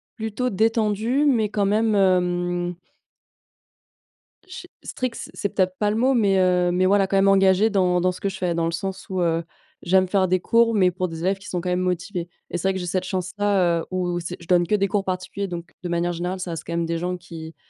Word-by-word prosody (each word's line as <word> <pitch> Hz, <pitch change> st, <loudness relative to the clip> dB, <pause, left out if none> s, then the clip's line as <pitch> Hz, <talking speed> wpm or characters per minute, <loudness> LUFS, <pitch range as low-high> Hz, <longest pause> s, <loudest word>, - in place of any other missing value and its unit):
plutôt 220 Hz, +3 st, -2 dB
détendue 225 Hz, +5 st, +1 dB
mais 230 Hz, -7 st, +2 dB
quand 205 Hz, -2 st, 0 dB
même, 215 Hz, +2 st, +2 dB
hem 175 Hz, -2 st, +1 dB, 1.7 s
ch 370 Hz, -1 st, -9 dB, 0.2 s
strict 255 Hz, -2 st, -4 dB
c'est -, -, -8 dB
c'est 200 Hz, -, -2 dB
peut-être 185 Hz, -1 st, 0 dB
pas 210 Hz, -1 st, +2 dB
le 210 Hz, -, 0 dB
mot, 255 Hz, +4 st, +3 dB
mais, 200 Hz, -6 st, +3 dB
heu, 180 Hz, -1 st, +3 dB
mais 185 Hz, +1 st, +2 dB
voilà, 195 Hz, 0 st, +3 dB
quand 195 Hz, -, +1 dB
même 195 Hz, 0 st, +4 dB
engagée 195 Hz, +2 st, +4 dB
dans 180 Hz, -3 st, +2 dB
dans 185 Hz, +1 st, +2 dB
ce 180 Hz, -, -11 dB
que 200 Hz, -, 0 dB
je 190 Hz, -, -7 dB
fais, 180 Hz, -2 st, -1 dB
dans 165 Hz, 0 st, 0 dB
le 165 Hz, -, -1 dB
sens 190 Hz, +3 st, -5 dB
où, 185 Hz, -1 st, -1 dB
heu, 165 Hz, -1 st, +1 dB, 0.4 s
j'aime 185 Hz, +1 st, +3 dB
faire 190 Hz, 0 st, +2 dB
des 185 Hz, 0 st, +2 dB
cours, 230 Hz, +4 st, +3 dB
mais 185 Hz, -3 st, +4 dB
pour 185 Hz, +1 st, -2 dB
des 165 Hz, -1 st, -7 dB
élèves 190 Hz, +2 st, +1 dB
qui 195 Hz, -, -13 dB
sont 175 Hz, -2 st, -3 dB
quand 180 Hz, -, -3 dB
même 180 Hz, 0 st, +1 dB
motivés, 180 Hz, 0 st, -2 dB, 0.2 s
et -, -, -3 dB
c'est 185 Hz, +3 st, -1 dB
vrai 190 Hz, -, +2 dB
que 190 Hz, -, -3 dB
j'ai 180 Hz, -, -4 dB
cette 185 Hz, +1 st, -1 dB
chance-là, 185 Hz, -2 st, 0 dB
heu, -, -, -8 dB
où, 180 Hz, -1 st, -1 dB
c'est 175 Hz, +1 st, -6 dB
je 170 Hz, -, -14 dB
donne 175 Hz, -1 st, +3 dB
que 210 Hz, -, +2 dB
des 200 Hz, -1 st, +1 dB
cours 200 Hz, +1 st, 0 dB
particuliers, 185 Hz, +2 st, -3 dB
donc 170 Hz, -2 st, -7 dB
de 175 Hz, -, -3 dB
manière 175 Hz, +1 st, 0 dB
générale 180 Hz, +2 st, -3 dB
ça 180 Hz, -1 st, -4 dB
reste 165 Hz, -1 st, -5 dB
quand -, -, -5 dB
même 170 Hz, 0 st, 0 dB
des 165 Hz, 0 st, -2 dB
gens 180 Hz, +2 st, -3 dB
qui 165 Hz, -2 st, -10 dB
185 Hz, 245 wpm, -23 LUFS, 175-200 Hz, 1.7 s, même